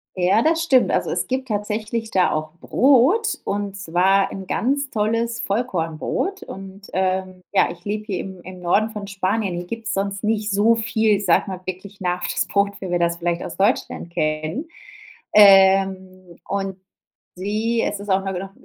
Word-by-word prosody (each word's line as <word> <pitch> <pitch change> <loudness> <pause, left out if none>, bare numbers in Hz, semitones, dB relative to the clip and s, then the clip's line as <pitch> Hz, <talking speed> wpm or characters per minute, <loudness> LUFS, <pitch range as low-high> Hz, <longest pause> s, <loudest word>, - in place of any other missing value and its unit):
Ja, 185 +4 +3
das 325 +4 +2
stimmt. 265 -6 +4
Also, - - 0
es - - -1
gibt 260 0 -2
tatsächlich 215 +1 -3
da 185 -1 +3
auch 155 0 -2
Brot, 285 - +3
und 200 0 -3
zwar 195 +1 +2
'n 190 -1 -7
ganz 280 +7 0
tolles 230 +2 -1
Vollkornbrot. 200 - -2
Und, 195 +1 -10
ähm 185 0 -1
ja, 195 - +4
ich 175 0 -13
lebe 210 +1 -3
hier 195 -5 -3
im 190 -2 -7
im 185 +1 -10
Norden 200 +5 +2
von 210 -2 -6
Spanien. 195 0 -1
Hier 175 +1 -5
gibt's 230 +2 -4
sonst 200 +1 -2
nicht 215 0 0
so 210 +3 +4
viel, 220 -2 +1
ich 205 - -5
sage 170 - +3
mal 185 -1 -6
wirklich 190 +2 -7
nach 180 -1 -1
das - - -1
Brot, 200 0 0
wie 190 - -5
wir 175 0 0
das 170 0 +1
vielleicht 170 0 -2
aus 170 - -7
Deutschland 200 -4 0
kennen, 155 - -2 0.7
ähm 190 -3 +5
und 195 -1 -3 0.6
sie 215 +5 -1
es - - -2
ist 205 0 -6
auch 190 0 +3
'ne 190 -2 -3
noch 195 +1 -6
195 Hz, 175 wpm, -22 LUFS, 185-220 Hz, 0.7 s, ähm